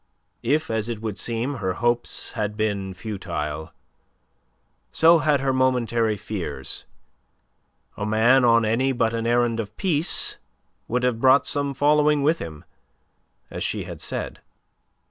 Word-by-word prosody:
If, 150 +3 0
as 110 0 -1
it 115 -3 -4
would 110 -2 -5
seem, 120 +4 -2
her 95 -4 -1
hopes 120 +4 -1
had 105 -2 -3
been 100 -3 -2
futile, 80 -8 -5 1.2
so 165 +1 +6
had 150 -3 +2
her 135 -1 +1
momentary 120 -4 +1
fears. 85 -10 -5 1.1
A - - -5
man 110 +5 +4
on 115 -1 +5
any 130 +5 +1
but 115 -2 +1
an 115 0 -2
errand 120 -1 +2
of 105 -1 -6
peace 170 -4 0 0.5
would 125 +2 -1
have 120 -2 0
brought 130 +1 +5
some 140 -1 0
following 150 +1 +3
with 160 +3 +2
him, 80 -2 -8 0.9
as - - -4
she - - -2
had - - -8
said. - - -4
115 Hz, 140 wpm, -24 LUFS, 105-135 Hz, 1.2 s, so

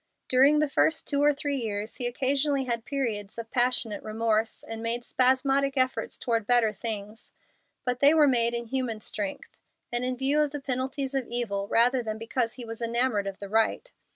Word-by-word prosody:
During 270 +4 +5
the 305 0 +2
first 315 +3 +1
two 285 -1 +1
or 295 0 +5
three 285 0 -2
years 215 -3 -4
he 245 - 0
occasionally 275 +3 0
had 235 -2 -3
periods 230 -9 -3
of 230 -1 -7
passionate 245 -4 0
remorse, 220 0 -1
and 225 0 -6
made 235 +1 -2
spasmodic 270 +2 +2
efforts 255 0 0
toward 230 -3 -1
better 240 -3 +3
things. 215 0 -6 0.5
But 250 -1 -1
they 285 +3 +6
were 305 -2 +6
made 235 -2 +2
in 235 0 -3
human 235 -3 -3
strength, 205 -1 -5 0.4
and 240 +1 -1
in 255 0 -1
view 275 +3 +2
of 300 - +1
the 290 +1 -5
penalties 265 +1 -3
of 270 -3 -1
evil, 210 -5 -2
rather 245 +4 +3
than 215 -2 -4
because 230 +1 -2
he 245 - -6
was 225 0 -8
enamored 230 -3 0
of 195 -1 -5
the 200 - -7
right. 225 - 0
245 Hz, 190 wpm, -27 LUFS, 225-270 Hz, 0.5 s, they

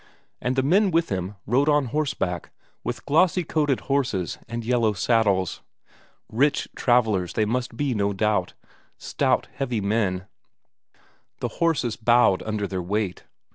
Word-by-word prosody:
And 125 +2 -1
the 130 - +2
men 190 +8 +4
with 165 -1 +1
him 95 +1 -3
rode 135 +7 +2
on 145 -2 +3
horseback 135 - -2 0.3
with - - -5
glossy 180 +4 +3
coated 150 -4 0
horses 125 - -1
and 115 0 -5
yellow 115 -3 +2
saddles; 100 -3 +1 0.7
rich 140 +6 +1
travellers 110 -8 +2
they 110 - +1
must 120 +1 -2
be 145 -3 0
no 100 -2 0
doubt; 100 -2 0 0.4
stout, - - 0
heavy 125 -5 -2
men; 100 -3 0 1.1
the - - -2
horses 145 -9 +1
bowed 120 -4 +4
under 105 -2 -2
their 95 -2 -3
weight. 100 +1 -2
115 Hz, 135 wpm, -24 LUFS, 100-140 Hz, 1.1 s, men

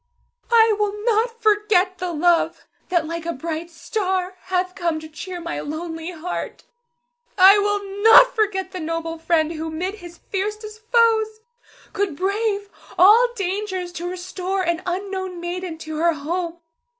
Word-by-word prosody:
I 450 -2 +5
will 415 -1 0
not 465 0 +1
forget 410 -3 +2
the 360 -1 -2
love 340 +1 +1 0.2
that 345 -3 +1
like 335 +1 -5
a 335 - -1
bright 325 +3 -5
star 370 +1 -2
hath 365 0 -1
come 340 -4 -1
to 315 - -10
cheer 350 +4 -7
my 340 0 -4
lonely 325 +2 -5
heart. 355 0 -6 0.7
I 390 +2 +8
will 405 -1 -2
not - - +8
forget 390 -4 0
the 370 - -6
noble 330 0 -4
friend 325 -1 +1
who, 320 0 -4
'mid 355 +5 -3
his 350 -5 -11
fiercest 425 +3 -5
foes, 440 -2 +3 0.5
could 395 -6 -1
brave 405 +3 -1 0.3
all 435 +7 +7
dangers 380 -2 -3
to 350 0 -5
restore 370 +1 -3
an 340 0 0
unknown 375 0 -3
maiden 350 -1 -5
to 315 -1 -6
her 335 +1 +3
home. 335 +3 -3
370 Hz, 150 wpm, -22 LUFS, 335-410 Hz, 0.7 s, I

